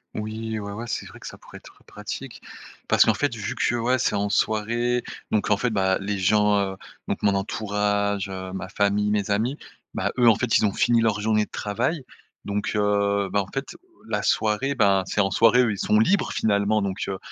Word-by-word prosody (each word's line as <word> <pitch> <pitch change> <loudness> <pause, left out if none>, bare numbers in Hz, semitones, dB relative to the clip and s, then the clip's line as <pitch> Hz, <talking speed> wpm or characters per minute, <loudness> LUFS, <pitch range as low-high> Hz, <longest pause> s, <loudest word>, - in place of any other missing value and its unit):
Oui, 110 +1 -4
ouais, 100 0 -6
ouais, 115 +4 -6
c'est - - -3
vrai - - -13
que - - -9
ça - - -9
pourrait - - -13
être - - -17
pratique, - - -8 0.5
parce - - +5
qu'en - - +3
fait 145 -4 -1
vu 105 -3 -4
que, 120 - 0
ouais, 120 +2 +1
c'est 105 - 0
en 100 0 0
soirée, 115 +4 0 0.3
donc 105 -1 0
en 105 - +4
fait 125 - 0
bah, 95 -3 +1
les 100 +1 -3
gens, 105 +2 +3 0.2
heu, 95 - -12 0.3
donc - - -3
mon 100 -1 +3
entourage, 100 0 -1
heu, 95 -1 -6
ma 95 -1 -6
famille, 100 +1 +1
mes 105 -1 0
amis, 115 +8 0 0.4
ben - - -1
eux 120 -2 +6
en 110 - +5
fait 120 +1 +2
ils - - +2
ont 100 - +2
fini 120 +1 +3
leur 110 -2 +1
journée 105 0 +2
de - - -31
travail, 125 +8 -2 0.4
donc 105 0 -2
heu, 100 -1 +1
ben 100 - +2
en 95 - -7
fait 135 - -5 0.3
la - - -2
soirée, 110 +6 +1
ben 100 -5 +3
c'est 100 - -3
en 100 -1 +3
soirée 115 +2 +4
eux 115 - +1
ils 100 - -4
sont 105 +2 +2
libres 195 - +2
finalement 105 0 +1
donc 95 0 -3
heu, 95 - -3
105 Hz, 220 wpm, -24 LUFS, 100-115 Hz, 0.5 s, eux